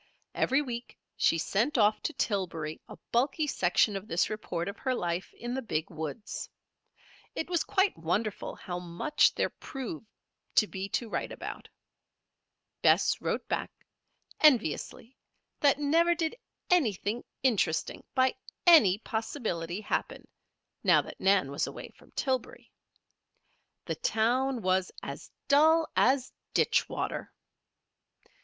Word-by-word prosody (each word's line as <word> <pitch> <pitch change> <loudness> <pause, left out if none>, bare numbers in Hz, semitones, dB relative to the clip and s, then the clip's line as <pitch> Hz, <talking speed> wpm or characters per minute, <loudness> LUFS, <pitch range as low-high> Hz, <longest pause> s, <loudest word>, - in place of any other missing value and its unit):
Every 270 +3 +2
week 240 -3 -6 0.2
she 165 - +3
sent 225 - 0
off 210 -1 +4
to 315 - -3
Tillbury 170 - -2
a - - -10
bulky 270 +6 +2
section 200 -4 +2
of 195 +2 -5
this 175 0 +1
report 180 -5 -3
of 200 - -6
her 260 -1 0
life 175 -3 -2
in 240 +1 -5
the 265 - -2
Big 160 -9 -3
woods. 160 +7 -5 0.9
It 330 - -3
was 345 - +2
quite 390 0 +2
wonderful 195 +6 -2
how 180 -2 -5
much 180 - +2
there - - 0
proved 230 - -7 0.5
to 215 - +6
be 195 -1 -5
to 235 - -1
write - - -3
about. - - -7 1.1
Bess - - +4
wrote - - -2
back, - - -2 0.7
enviously, 250 - +2 0.4
that 280 -2 +4
never 330 +4 +3
did 325 +4 -1 0.4
anything 230 - +1 0.2
interesting, 215 -11 +1
by 260 0 +4 0.3
any 265 - +7
possibility, 215 - -3
happen, 215 - -3 0.6
now - - +5
that - - -11
Nan 190 -8 +3
was 140 - -1
away - - -8
from - - -20
Tillbury. 275 - -2 1.1
The - - -2
town 245 +2 +1
was 185 0 +1
"as - - -7 0.2
dull 315 +3 +5
as 260 0 +3 0.2
ditch - - +3
water." - - -4
225 Hz, 130 wpm, -29 LUFS, 185-275 Hz, 1.1 s, any